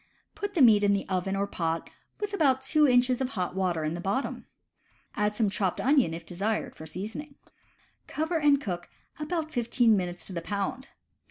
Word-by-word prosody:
Put 405 -1 -5
the 305 - +5
meat 215 -4 +7
in 200 -1 +4
the 200 - -1
oven 190 +1 -1
or 200 +1 0
pot 165 -4 -2 0.3
with 415 -1 -3
about 270 -8 +2
two 300 +2 +4
inches 250 0 +3
of 260 - 0
hot 185 -8 -3
water 180 -4 0
in 155 +1 -1
the 175 - -5
bottom. 200 +9 -2 0.7
Add 210 0 0
some 220 -1 +2
chopped 195 -2 -1
onion, 270 - +3
if 165 0 -9
desired, 200 +6 -2
for 160 - -9
seasoning. 220 - -6 0.7
Cover 320 +2 -1
and 290 -2 +4
cook, 175 -9 -5 0.3
about 315 +1 -2
fifteen 235 -3 +3
minutes 180 -2 -3
to 190 - -8
the 170 - -3
pound. 205 +8 -3
215 Hz, 185 wpm, -28 LUFS, 185-275 Hz, 0.7 s, meat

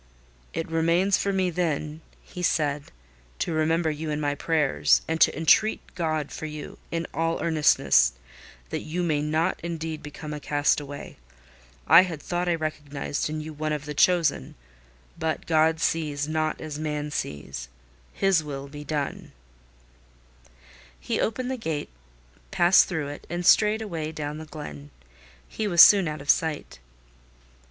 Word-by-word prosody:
"It 165 - -3
remains 170 +4 +2
for 200 - 0
me, 190 -2 0
then," 155 -2 -2 0.2
he 180 - -9
said, 150 -4 0 0.5
"to 165 - -2
remember 160 +1 +1
you 155 +1 -5
in 150 0 -2
my 145 -1 0
prayers, 150 -1 +2
and 160 0 -2
to - - +5
entreat 190 +7 +2
God 155 -4 -2
for 155 - -5
you, 150 -1 -8
in 165 0 -2
all 165 0 0
earnestness, 145 - +3 0.6
that - - -1
you 175 +3 -3
may 155 -4 +1
not 155 +2 0
indeed 165 -2 -4
become 150 +1 -8
a 150 - -5
castaway. 145 -1 -1 0.7
I 165 +4 +9
had 175 -5 -4
thought 175 +3 -2
I 170 - +2
recognised 150 -3 -3
in 155 0 -4
you 155 +1 -7
one 155 +1 -3
of 150 -1 -3
the 150 - -5
chosen. 165 - +2 0.6
But 160 -1 -2
God 160 0 +3
sees 150 -3 -1
not 155 0 -1
as 155 -1 -6
man 150 -1 -3
sees: 70 - -5 0.4
His 195 -5 +2
will 140 -2 -6
be 145 +1 -9
done—" 150 -2 -4 1.7
He - - -2
opened 250 +4 -1
the 260 - -2
gate, 160 -10 -3 0.6
passed 175 - +5
through 160 -5 -3
it, 145 - -9
and 175 +1 -3
strayed 215 +3 +5
away 165 -6 -4
down 150 -1 -5
the 160 - -8
glen. 75 - -9 0.6
He 215 - -3
was 175 -4 0
soon 195 -1 +9
out 150 -1 -4
of 140 - -11
sight. 150 - -2
155 Hz, 155 wpm, -26 LUFS, 150-170 Hz, 1.7 s, I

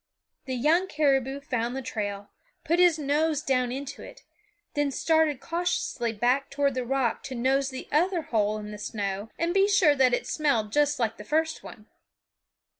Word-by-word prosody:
The 260 -2 -3
young 320 +9 +2
caribou 275 -4 +1
found 245 -2 -2
the 270 - -4
trail, 205 -4 -4 0.3
put 335 +1 +1
his 355 -3 +5
nose 300 +1 0
down 255 -2 +1
into 275 +2 -6
it, - - -12 0.5
then 290 -1 +1
started 315 0 +1
cautiously 330 -8 -2
back 245 +5 +1
toward 280 -1 0
the 255 0 -2
rock 255 -1 0
to 260 - -5
nose 265 +3 +1
the 260 -1 -7
other 340 +3 +2
hole 215 -4 0
in 210 0 -7
the 210 - -8
snow 200 0 -4
and 335 +1 0
be 390 +1 +4
sure 395 -7 +5
that 255 -2 +4
it - - -5
smelled 235 -9 0
just 295 0 +2
like 230 -3 -1
the 210 - -9
first 315 +7 0
one. 215 - -12
270 Hz, 180 wpm, -27 LUFS, 240-310 Hz, 0.5 s, his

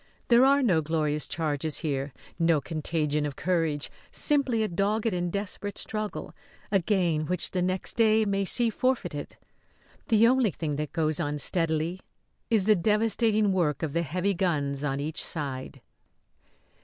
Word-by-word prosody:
There 240 +1 +6
are 280 +1 +4
no 180 -9 +3
glorious 150 -1 -1
charges 155 -1 -1
here, 140 -3 -2 0.3
no 165 -2 +3
contagion 150 -1 -2
of 145 -2 -3
courage; 165 -5 -1 0.2
simply 270 -7 +2
a - - 0
dogged 210 +4 0
and 175 -1 -2
desperate 200 +1 -4
struggle 215 -1 -4 0.4
a 195 - +4
gain 170 -5 0
which 180 0 0
the 180 - -1
next 185 +1 -1
day 220 -1 +4
may 200 -1 0
see 230 +5 +3
forfeited. 255 +4 -2 0.7
The 225 -1 +4
only 255 -2 +3
thing 155 -4 -4
that 150 -1 -4
goes 155 -2 0
on 150 -3 -2
steadily 165 +2 0 0.5
is 215 -5 +2
the 215 0 +5
devastating 215 +1 +2
work 165 -7 0
of 150 -3 -2
the 170 - +1
heavy 180 +6 -1
guns 145 -6 -1
on 135 -1 -1
each 150 +2 -1
side. 135 -3 -4
175 Hz, 155 wpm, -27 LUFS, 150-210 Hz, 0.7 s, There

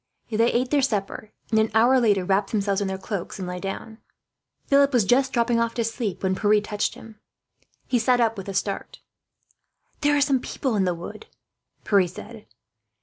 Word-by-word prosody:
They 230 +2 +2
ate 250 +1 0
their 290 -2 +3
supper 210 -4 -2 0.2
and, 220 - +3
an 220 0 +2
hour 245 +4 +5
later, 205 -6 +2
wrapped 195 +2 +1
themselves 200 -2 0
in 200 - -1
their 190 0 -3
cloaks 190 -1 -5
and 185 -2 -5
lay 180 0 -5
down. 210 +4 -6 0.7
Philip 280 0 +4
was 235 -5 +3
just 260 +5 +3
dropping 235 -1 +1
off 230 0 -1
to 235 - 0
sleep, 225 -4 -3
when 190 0 +1
Pierre 210 +2 +3
touched 210 0 -2
him. 220 -1 -13 0.7
He 245 - +1
sat 245 +2 +2
up 225 -1 +2
with 195 -1 -7
a 195 - -5
start. 200 +1 -3 1.0
"There 290 0 +2
are - - +2
some 275 -2 +3
people 250 -1 -3
in 195 -2 +2
the 180 -1 0
wood," 175 - -9 0.6
Pierre 195 -3 +3
said. 215 +5 -11
220 Hz, 195 wpm, -24 LUFS, 195-245 Hz, 1.0 s, hour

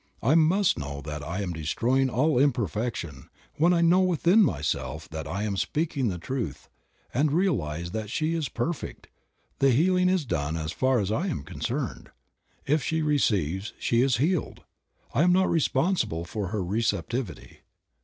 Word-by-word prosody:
I 130 +6 +4
must 165 - +3
know 70 -1 -5
that 75 +1 -6
I 85 +7 -3
am 90 -3 -3
destroying 120 - +1
all 130 +3 +2
imperfection; 110 - -1 0.3
when 170 +4 +4
I 170 -1 +3
know 170 +2 +5
within 180 +3 +4
myself 75 - -1
that 80 -2 -6
I 100 +7 -3
am 105 -2 -1
speaking 145 - -1
the 90 -4 -2
truth 100 - -5 0.4
and 145 +3 +2
realize 85 - 0
that 110 0 -4
she 155 +7 -1
is 160 -5 -2
perfect, 150 +7 -4 0.5
the 135 - +4
healing 180 +8 +3
is 185 -5 +1
done 75 - -2
as 80 0 -3
far 130 +6 +1
as 100 -1 -1
I 160 - 0
am 160 - -3
concerned. 120 - -4 0.6
If 150 +2 +2
she 160 +4 -1
receives 100 - 0
she 120 0 +1
is 130 -3 +2
healed; 160 +6 -1 0.5
I - - +2
am 180 +2 +5
not 185 +1 +3
responsible 145 - +1
for 100 +2 -4
her 100 +1 -2
receptivity. 115 +3 -2
120 Hz, 165 wpm, -27 LUFS, -, 0.6 s, know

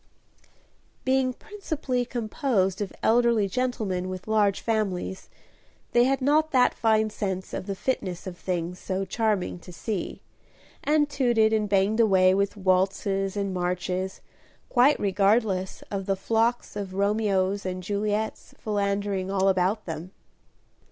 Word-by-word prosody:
Being 260 0 +2
principally 295 - -3
composed 215 -5 -1
of 200 - -3
elderly 235 -2 +3
gentlemen 200 -5 -2
with 185 +1 -7
large 210 -3 +2
families, 195 -4 -2 0.6
they 240 0 +5
had 270 +1 +1
not 305 +3 +3
that 255 -4 +4
fine 220 -1 +2
sense 190 -3 -4
of 185 - -4
the 195 - -2
fitness 185 -6 -3
of 185 -2 -6
things 175 0 -3
so 190 0 -2
charming 210 -5 -1
to 180 - -12
see, 190 +3 -4 0.6
and 295 0 +3
tooted 240 -6 +2
and 215 -2 +1
banged 200 +3 +2
away 190 -4 +5
with 200 +1 0
waltzes 195 +1 +1
and 200 -1 -1
marches, 180 +1 -2 0.5
quite 265 +4 +4
regardless 195 -1 +1
of 195 -2 -3
the 195 - +2
flocks 225 +5 0
of 195 -2 -5
Romeos 200 -1 +1
and 185 0 -4
Juliets 210 +2 -2
philandering 200 -2 -1
all 195 0 +2
about 190 +3 +1
them. 165 +3 -6
200 Hz, 130 wpm, -26 LUFS, 190-225 Hz, 0.6 s, they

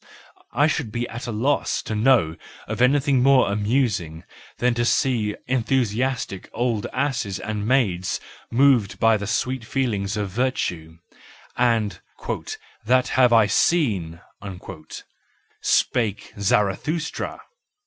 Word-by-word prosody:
I 145 - +3
should 145 -7 -1
be 120 +2 -2
at 120 +2 -7
a - - -3
loss 130 +7 0
to - - -4
know 110 -8 +3 0.3
of - - -3
anything 135 0 +3
more 130 -5 +4
amusing 105 - -1 0.3
than 125 0 +2
to 120 0 0
see 120 -4 +1
enthusiastic 125 -3 -1
old 115 -4 -1
asses 125 -8 -1
and 105 -1 -4
maids 100 -9 +1 0.3
moved 125 -5 +3
by 115 0 +4
the 100 -1 -3
sweet 125 +3 -1
feelings 110 -5 -1
of 100 -2 -3
virtue: 90 -9 -2 0.6
and 110 -6 +1 0.4
" - - -11
that 125 +1 +3
have 125 -2 +4
I 115 -2 +6
seen 100 - +1 1.4
"—spake 110 -5 0
Zara 100 -1 +2
thustra. 160 - -4
115 Hz, 120 wpm, -23 LUFS, 105-130 Hz, 1.4 s, I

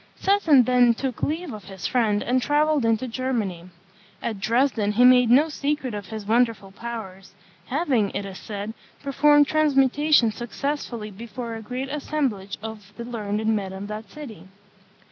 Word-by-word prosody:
Seton 335 -10 +4
then 245 -1 +4
took 255 -1 -4
leave 320 -1 -2
of 210 -4 -9
his 190 -3 -8
friend, 215 -4 +1
and 255 +1 +1
travelled 295 -1 +2
into 225 +3 +1
Germany. 225 -8 -2 0.5
At 220 -4 -4
Dresden 225 -1 +1
he 245 +4 +5
made 250 -1 +6
no 275 +6 +6
secret 290 -4 -2
of 205 -2 -6
his 220 -2 -7
wonderful 225 -3 +1
powers, 195 -3 -8 0.3
having, 260 - +1
it 200 - -2
is 190 -1 -8
said, 210 +1 -6 0.3
performed 290 +1 +4
transmutation 290 -3 +3
successfully 240 -1 -4
before 230 +3 -7
a 225 - -6
great 255 +4 -5
assemblage 270 -9 -2
of 210 -2 -8
the 235 - -5
learned 215 -3 -3
men 205 -4 0
of 195 +1 -6
that 215 +1 -6
city. 225 - -10
235 Hz, 155 wpm, -24 LUFS, 210-275 Hz, 0.5 s, made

